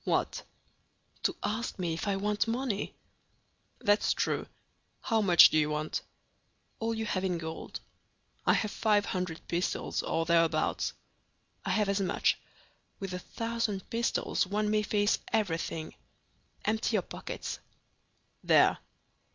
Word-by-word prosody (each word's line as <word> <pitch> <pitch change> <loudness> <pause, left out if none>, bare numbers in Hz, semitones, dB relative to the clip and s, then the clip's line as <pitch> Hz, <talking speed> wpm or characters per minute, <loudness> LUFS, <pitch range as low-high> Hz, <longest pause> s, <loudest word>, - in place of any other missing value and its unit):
"What?" - - 0 0.8
"To - - +1
ask 220 +3 -2
me 175 -3 -1
if 165 - -4
I 200 - +2
want 210 +3 0
money." 230 -3 -2 0.9
"That's 205 +1 +3
true. - - -1 0.5
How 225 -3 +1
much 180 -4 +8
do 155 - +4
you 150 0 +2
want?" 150 0 -2 0.8
"All 225 0 -1
you 220 0 -2
have 190 -3 -1
in 180 -2 0
gold." 160 -1 -6 0.6
"I - - +4
have 210 - 0
five 210 -2 +2
hundred 180 -3 -3
pistoles, 175 +1 -1
or 165 0 0
thereabouts." 165 -1 +2 0.7
"I - - -3
have 210 -2 +2
as 200 0 +1
much. 185 - +2 0.6
With 195 -2 -4
a 180 - -3
thousand 230 -2 -3
pistoles 230 -4 0
one 210 +2 0
may 215 0 +3
face 205 0 +2
everything. 165 -6 -1 0.7
Empty 220 +1 +1
your - - +2
pockets." - - -6 0.8
"There." - - +5
200 Hz, 135 wpm, -30 LUFS, 170-215 Hz, 0.9 s, much